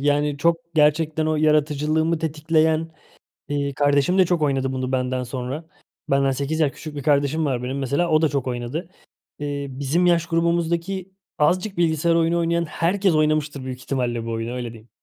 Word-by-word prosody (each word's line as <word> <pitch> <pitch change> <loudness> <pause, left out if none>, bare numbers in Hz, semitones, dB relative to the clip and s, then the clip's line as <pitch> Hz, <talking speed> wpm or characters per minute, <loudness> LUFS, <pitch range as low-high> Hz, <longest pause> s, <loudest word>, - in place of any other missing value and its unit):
yani, 145 0 +1
çok 165 +3 +3 0.2
gerçekten 155 +1 +2
o 155 0 +1
yaratıcılığımı 155 +1 +2
tetikleyen, 160 +1 +1 0.6
eee, 140 -1 -2
kardeşim 145 +5 +2
de 185 - +6
çok 170 -3 0
oynadı 135 -2 +1
bunu 130 0 -3
benden 125 0 0
sonra. 130 +5 -5 0.5
Benden 135 0 +3
8 140 +4 -2
yaş 145 -3 +2
küçük 155 0 -9
bir 140 - -4
kardeşim 145 +2 +2
var 130 -4 -1
benim, 130 +2 -3
mesela, 140 +6 0
o 155 0 +4
da 160 - +4
çok 140 -2 -2
oynadı. 125 +8 -4 0.5
Eee, 145 -1 -3
bizim 140 +7 0
yaş 170 -1 +3
grubumuzdaki 170 +2 0 0.3
azıcık 185 +7 +1
bilgisayar 165 -1 +2
oyunu 165 +1 +2
oynayan 170 0 +1
herkes 175 +4 +1
oynamıştır 155 -2 +1
büyük 130 -1 -6
ihtimalle 120 -4 -2
bu - - -3
oyunu, 115 +1 -3
öyle 120 -2 -4
diyeyim. 115 0 -15
150 Hz, 170 wpm, -22 LUFS, 135-165 Hz, 0.6 s, de